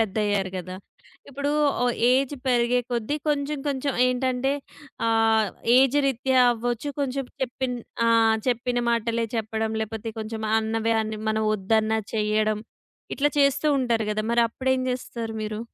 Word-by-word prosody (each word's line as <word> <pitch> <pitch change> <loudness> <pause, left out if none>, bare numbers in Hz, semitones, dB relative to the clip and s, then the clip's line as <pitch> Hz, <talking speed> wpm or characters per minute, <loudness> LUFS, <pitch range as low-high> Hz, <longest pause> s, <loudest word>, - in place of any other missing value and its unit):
పెద్దయ్యారు 205 -2 0
గదా! 185 +1 -7 0.5
ఇప్పుడు 280 +1 -2 0.3
ఓ - - +3 0.3
ఏజ్ 270 +2 +2
పెరిగే 245 0 +3
కొద్దీ 240 +5 -1
కొంచెం, 290 0 0
కొంచెం 275 0 -1
ఏంటంటే 255 +1 0 0.5
ఆహ్, 225 -2 +3 0.3
ఏజ్ 270 +2 +4
రీత్యా 260 0 +2
అవ్వచ్చు 240 +3 -3
కొంచెం 275 -1 -1 0.2
చెప్పిన్ 255 0 -2 0.3
ఆహ్, 225 -1 +4
చెప్పిన 245 0 0
మాటలే 230 0 0
చెప్పడం 220 0 -2
లేపోతే 220 +1 -5
కొంచెం 220 0 -5
అన్నవే 225 +1 0
అని, 215 0 -5
మనం 220 0 0
ఒద్దన్నా 220 +2 +1 0.2
చెయడం. 215 0 +1 0.5
ఇట్లా 290 +1 +2
చేస్తూ 280 +2 +2
ఉంటారు 230 -4 0
గదా! 215 0 -2
మరి 235 0 +4
అప్పుడు 260 +3 -2
ఏం 260 - -1
జేస్తారు 235 -3 -5
మీరు? 215 0 -4
230 Hz, 135 wpm, -25 LUFS, 220-260 Hz, 0.5 s, ఏజ్